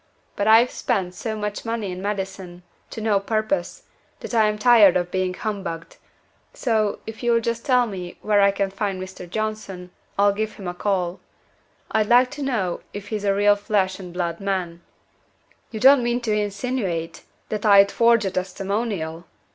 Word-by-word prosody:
But 205 - -1
I've 225 +3 +6
spent 185 -5 -1
so 220 +4 -4
much 210 -1 -4
money 225 -4 -3
in 180 +1 -6
medicine, 190 -3 -5 0.3
to 225 - -7
no 215 -2 +2
purpose, 200 -3 -2 0.4
that - - -7
I 220 -2 +4
am 210 0 -1
tired 210 -5 +6
of 175 0 -3
being 185 -1 -1
humbugged: 195 -7 -5 0.6
so, 220 -4 0
if 220 0 -8
you'll 235 -1 +3
just 230 0 -3
tell 250 -3 +4
me 185 -5 -7
where 210 -1 +3
I 200 - +6
can 200 -1 -1
find 195 -1 -3
this 185 0 -7
Mr. 180 - -10
Johnson, 200 -3 -4 0.3
I'll 200 0 +4
give 215 +1 -3
him 195 - -9
a 175 - -3
call. 180 -2 -1 0.7
I'd 215 -1 +1
like 250 +1 +5
to 295 - -7
know 220 -10 -1
if 205 0 -8
he's 210 -2 -3
a 200 -1 +2
real 205 +1 +4
flesh 200 -2 -1
and 180 -2 -8
blood 170 -1 -3
man." 185 -4 -3 0.9
"You 220 - -6
don't 265 +3 +7
mean 240 0 0
to 225 -3 -1
insinuate 205 -4 -2 0.3
that 215 -1 -3
I'd 200 -2 +6
forge 230 -2 +3
a 190 - -1
testimonial?" 185 -2 -3
205 Hz, 180 wpm, -23 LUFS, 185-220 Hz, 0.9 s, don't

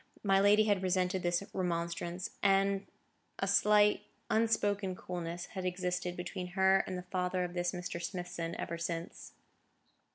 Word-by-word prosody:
My 195 -1 +4
lady 205 +2 +6
had 205 -3 +2
resented 185 0 +1
this 175 +2 +1
remonstrance, 170 0 -2
and 195 0 +2 0.5
a - - -1
slight, 210 0 +4 0.3
unspoken 205 -4 +1
coolness 175 -1 -5
had 190 - -4
existed 180 -1 -2
between 180 0 -4
her 190 0 +5
and 185 - -3
the 180 - -6
father 180 0 -1
of 175 0 -4
this 175 0 0
Mr. 180 -1 -5
Smithson 170 -2 -4
ever 170 0 -4
since. 170 0 -5
180 Hz, 140 wpm, -33 LUFS, 175-195 Hz, 0.5 s, lady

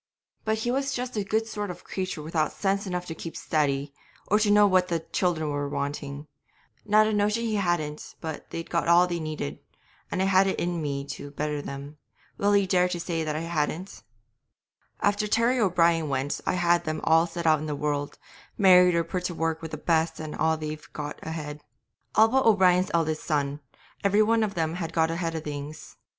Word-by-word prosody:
But 220 0 +1
he 240 +2 -1
was 275 +1 -1
just 250 0 -4
a 210 - 0
good 220 +3 0
sort 210 -2 -4
of 180 0 -8
creature 185 -5 -4
without 155 -1 0
sense 195 0 -1
enough 180 -1 -3
to 160 - -5
keep 165 0 -7
steady, 140 -2 0 0.3
or 210 - +3
to 215 -1 +2
know 205 0 +6
what 185 -2 +3
the 170 -2 -1
children 165 -2 -1
were 145 0 -2
wanting; 140 0 -4 0.6
not 215 +1 +5
a 215 - 0
notion 210 +2 +1
he 220 -2 0
hadn't 175 -6 -2
but 160 -2 -4
that - - -22
they'd 165 - -6
got 170 -1 0
all 170 +1 +6
they 175 -1 -3
needed, 155 - -4 0.5
and - - -2
I 190 - +2
had 195 0 +4
it 190 - -1
in 175 -1 -1
me 140 -2 -3
to 145 0 -6
better 150 0 -3
them. 140 +2 -8 0.4
Will 205 0 +4
ye 200 - +2
dare 180 -1 +3
to 175 - -3
say 165 -1 -2
that 155 -1 -2
I 155 - -2
hadn't? 165 +2 -3 1.0
'After 205 +1 +1
Terry 235 +4 +2
O'Brien 170 -6 +3
went 135 +1 -2
I - - +2
had 175 -1 +2
them 155 0 -2
all 165 +1 +4
set 170 0 -6
out 155 -1 +5
in 155 - -5
the 150 - -2
world, 145 0 -2 0.4
married 180 -2 +6
or 170 - +2
put 180 +2 -4
to 175 - -2
work 165 0 -1
with 160 - -6
the 155 - -5
best, 160 +1 +1
and 155 -1 -5 0.3
they've 155 0 -6
got 150 0 -5
ahead. 150 -2 -6 0.5
All 220 +1 +7
but 265 +3 +2
O'Brien's 185 -4 +4
eldest 160 -2 0
son, 145 -2 -1 0.4
every 205 +2 +4
one 225 +1 +2
of 210 -2 -1
them 160 -1 0
have 165 -1 -4
got 160 0 +2
ahead 165 -1 -2
of 160 - -4
things. 150 0 -7
170 Hz, 210 wpm, -26 LUFS, 155-195 Hz, 1.0 s, All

